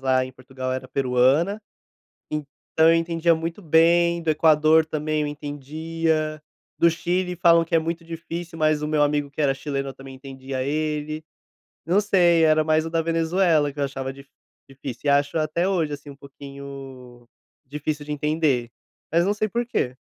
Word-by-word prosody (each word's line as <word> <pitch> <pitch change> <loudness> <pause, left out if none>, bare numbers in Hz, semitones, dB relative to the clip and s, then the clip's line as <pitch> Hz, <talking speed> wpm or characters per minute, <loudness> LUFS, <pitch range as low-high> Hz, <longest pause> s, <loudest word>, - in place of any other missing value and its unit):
lá 130 -1 +2
em 130 - -9
Portugal 130 0 -6
era 130 - -5
peruana, 135 +9 +2 0.7
então 150 +2 0
eu 165 - +5
entendia 165 0 +2
muito 165 +4 -5
bem, 170 +1 +3
do 165 - -2
Equador 155 +1 +4
também 155 -1 -2
eu 150 - -1
entendia, 155 +2 -3 0.4
do 170 - +6
Chile 180 +2 -1
falam 170 -1 +5
que 165 - -1
é - - +5
muito 165 +1 -4
difícil, 165 0 -7
mas 155 -1 +2
o 150 - -2
meu 150 -1 +2
amigo 145 -1 0
que 145 +2 -4
era 140 -2 +3
chileno, 140 0 -4
eu - - -8
também 135 0 -11
entendia 130 -1 -6
ele, 155 +1 -2 0.6
não 180 +5 +3
sei, 175 -5 +3
era 155 0 +4
mais 155 0 +2
o - - -4
da 165 0 0
Venezuela 165 -2 +2
que 145 - -11
eu - - +1
achava 135 -1 -4
dif 140 0 -14 0.4
difícil 135 -2 -8
e - - +4
acho 145 +2 +2
até 155 +3 0
hoje, 170 -6 0
assim, 145 0 -9
um - - -12
pouquinho 135 -3 -11 0.4
difícil 150 +2 -4
de 150 - -6
entender, 150 -5 0 0.4
mas 170 +2 +3
não 200 - +2
sei 215 0 -1
porquê. 235 - -2
155 Hz, 175 wpm, -23 LUFS, 140-165 Hz, 0.7 s, do